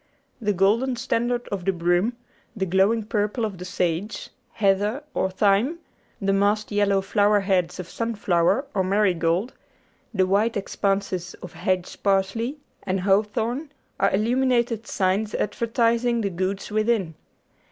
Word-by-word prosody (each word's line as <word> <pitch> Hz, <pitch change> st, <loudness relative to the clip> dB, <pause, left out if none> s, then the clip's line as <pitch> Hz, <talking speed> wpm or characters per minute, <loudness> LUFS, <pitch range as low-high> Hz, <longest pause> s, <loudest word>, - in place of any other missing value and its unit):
The 210 Hz, -2 st, +1 dB
golden 215 Hz, +7 st, +2 dB
standard 240 Hz, +1 st, -1 dB
of 195 Hz, -3 st, -3 dB
the 195 Hz, -, +2 dB
broom, 175 Hz, +5 st, +1 dB, 0.4 s
the 195 Hz, -3 st, -1 dB
glowing 195 Hz, +5 st, +2 dB
purple 210 Hz, +1 st, -1 dB
of 200 Hz, -4 st, -6 dB
the 180 Hz, -, -6 dB
sage, 180 Hz, +2 st, -2 dB, 0.2 s
heather, 205 Hz, +6 st, +1 dB
or 190 Hz, -, 0 dB
thyme, 205 Hz, -, +2 dB, 0.4 s
the 195 Hz, -1 st, +1 dB
massed 205 Hz, +2 st, +1 dB
yellow 200 Hz, -1 st, +2 dB
flower 205 Hz, +1 st, +3 dB
heads 185 Hz, -2 st, 0 dB
of 180 Hz, -, -5 dB
sunflower 210 Hz, +1 st, 0 dB
or 190 Hz, -2 st, +1 dB
marigold, 185 Hz, +1 st, +1 dB, 0.6 s
the 190 Hz, -4 st, +2 dB
white 210 Hz, +4 st, +1 dB
expanses 195 Hz, -2 st, -2 dB
of 180 Hz, -, -8 dB
hedge 185 Hz, -1 st, -2 dB
parsley 200 Hz, +7 st, 0 dB, 0.2 s
and 190 Hz, -1 st, -2 dB
hawthorn, 220 Hz, -, 0 dB, 0.3 s
are 195 Hz, -, +3 dB
illuminated 235 Hz, +1 st, +1 dB
signs 200 Hz, +2 st, 0 dB
advertising 235 Hz, +2 st, +1 dB
the 200 Hz, -2 st, -1 dB
goods 190 Hz, +3 st, -3 dB
within. 215 Hz, -5 st, +1 dB
205 Hz, 130 wpm, -24 LUFS, 190-230 Hz, 0.6 s, flower